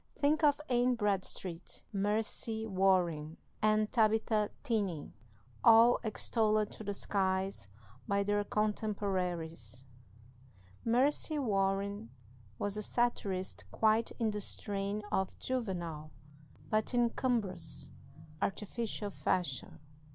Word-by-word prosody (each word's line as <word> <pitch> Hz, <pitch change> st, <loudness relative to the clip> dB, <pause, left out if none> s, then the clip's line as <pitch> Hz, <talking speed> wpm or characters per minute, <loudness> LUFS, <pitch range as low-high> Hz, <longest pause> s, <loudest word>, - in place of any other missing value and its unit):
Think 295 Hz, +3 st, +2 dB
of 290 Hz, -1 st, +5 dB
Anne 245 Hz, 0 st, +3 dB
Bradstreet, 195 Hz, -5 st, -2 dB
Mercy 220 Hz, +2 st, -1 dB
Warren, 180 Hz, -6 st, +1 dB, 0.2 s
and 215 Hz, 0 st, +3 dB
Tabitha 220 Hz, -2 st, +2 dB
Tenney, 205 Hz, -, -1 dB, 0.5 s
all 230 Hz, +1 st, +7 dB
extolled 215 Hz, -1 st, +2 dB
to -, -, -9 dB
the 205 Hz, -1 st, -3 dB
skies 190 Hz, -, -1 dB, 0.4 s
by 200 Hz, 0 st, +2 dB
their 205 Hz, +1 st, +1 dB
contemporaries. 180 Hz, -, -1 dB, 1.0 s
Mercy 275 Hz, +6 st, +2 dB
Warren 200 Hz, -, 0 dB, 0.5 s
was 205 Hz, -, -2 dB
a -, -, -2 dB
satirist 200 Hz, -5 st, -1 dB
quite 220 Hz, +1 st, +2 dB
in 225 Hz, -3 st, +1 dB
the 210 Hz, 0 st, -3 dB
strain 200 Hz, +1 st, -2 dB
of 190 Hz, -1 st, 0 dB
Juvenal, 175 Hz, -11 st, -3 dB, 0.6 s
but 215 Hz, +3 st, +1 dB
in 240 Hz, -1 st, +3 dB
cumbrous, 185 Hz, -, -1 dB, 0.5 s
artificial 210 Hz, 0 st, -2 dB
fashion. 170 Hz, -8 st, -1 dB
205 Hz, 100 wpm, -33 LUFS, 190-225 Hz, 1.0 s, all